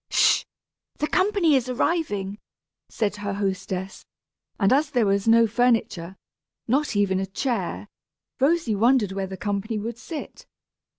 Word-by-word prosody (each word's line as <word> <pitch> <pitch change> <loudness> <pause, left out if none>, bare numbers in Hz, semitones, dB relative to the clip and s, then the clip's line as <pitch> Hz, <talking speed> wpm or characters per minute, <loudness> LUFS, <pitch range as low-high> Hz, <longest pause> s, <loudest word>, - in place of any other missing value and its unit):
"Sh - - +4
h! - - -13 0.5
the - - 0
company 375 -3 +2
is 255 -1 0
arriving!" 215 - -1 0.5
said 210 -2 -2
her 205 -1 -3
hostess; 190 -1 -3 0.6
and 195 +3 +4
as 290 +2 +2
there 245 -6 +2
was 200 +1 +1
no 230 0 +6
furniture, 225 -6 0 0.5
not 270 +1 +1
even 195 -2 +2
a 190 - -2
chair, 210 -1 -3 0.5
Rosy 285 -3 +2
wondered 225 0 +3
where 195 0 -3
the 190 0 -7
company 205 +2 -2
would 230 +2 -5
sit. 310 +3 -8
215 Hz, 140 wpm, -24 LUFS, 195-260 Hz, 0.6 s, no